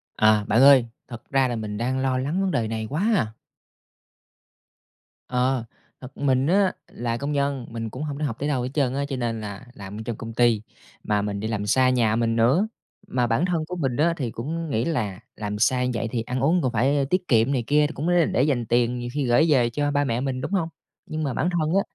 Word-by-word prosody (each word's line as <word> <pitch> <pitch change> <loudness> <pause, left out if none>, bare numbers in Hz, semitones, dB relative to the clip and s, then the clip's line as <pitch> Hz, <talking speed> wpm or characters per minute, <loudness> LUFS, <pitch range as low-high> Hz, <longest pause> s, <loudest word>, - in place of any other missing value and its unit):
À, 110 -1 +4
bạn 115 +4 +3
ơi, 135 -3 +7 0.2
thật 120 -2 -10
ra 135 -1 +3
là 120 - -2
mình 105 -2 -4
đang 130 +4 -1
lo 130 -1 +1
lắng 145 +9 -1
vấn 195 -1 0
đề 115 -8 0
này 110 0 -3
quá 195 +10 0
à! 110 - 0 1.9
Ờ, 125 0 0 0.4
thật 130 +1 -11
mình 135 -1 +2
á 195 +1 +3 0.2
là 120 -1 -3
công 140 +3 -3
nhân, 140 -3 -1
mình 115 -1 -5
cũng 130 +7 -6
hông 145 -2 -4
để 150 - -1
học 120 -6 -2
tới 145 - -1
đâu 135 -4 0
hết 125 - -3
trơn 135 -4 +1
á, 140 +1 -1
cho 135 - -2
nên 115 -3 -2
là 105 +3 -7
làm 100 -2 -9
ở - - -4
trong 120 - -3
công 115 0 -7
ty 115 -2 +3 0.4
mà 105 -1 +1
mình 100 -1 -3
đi 110 - -3
làm 105 -2 -2
xa 130 +5 +3
nhà 115 -4 +2
mình 115 0 +1
nữa. 130 - +3 0.4
Mà 125 -1 0
bản 115 +9 +1
thân 170 -4 -1
của 180 - -5
mình 135 -8 -1
á, 165 +3 +3
thì 125 -7 -3
cũng 160 +8 -4
nghĩ 115 -3 0
là 105 - -2 0.2
làm 105 -1 -4
xa 125 +2 +2
vậy 115 - -2
thì 120 - -1
ăn 125 +3 -3
uống 160 +7 +3
còn 130 -4 0
phải 135 +5 +2
tiết 185 +1 0
kiệm 115 0 +3
này 130 -4 0
kia, 150 +1 +4
thì 155 - -8
cũng 150 +3 -3
l - - +2 0.2
để 125 - +2
dành 135 -5 +1
tiền 120 +2 +1
nhiều 120 0 -4
khi 145 -1 -1
gởi 120 +5 +4
về 125 -5 +4
cho 145 +4 -1
ba 145 0 +2
mẹ 120 -3 -1
mình, 130 -1 -2
đúng - - -4
hông? 180 -5 0 0.4
Nhưng 155 0 -4
mà 140 -3 -1
bản 170 - 0
thân 165 -4 0
á, 195 - +4
130 Hz, 250 wpm, -24 LUFS, 115-145 Hz, 1.9 s, ơi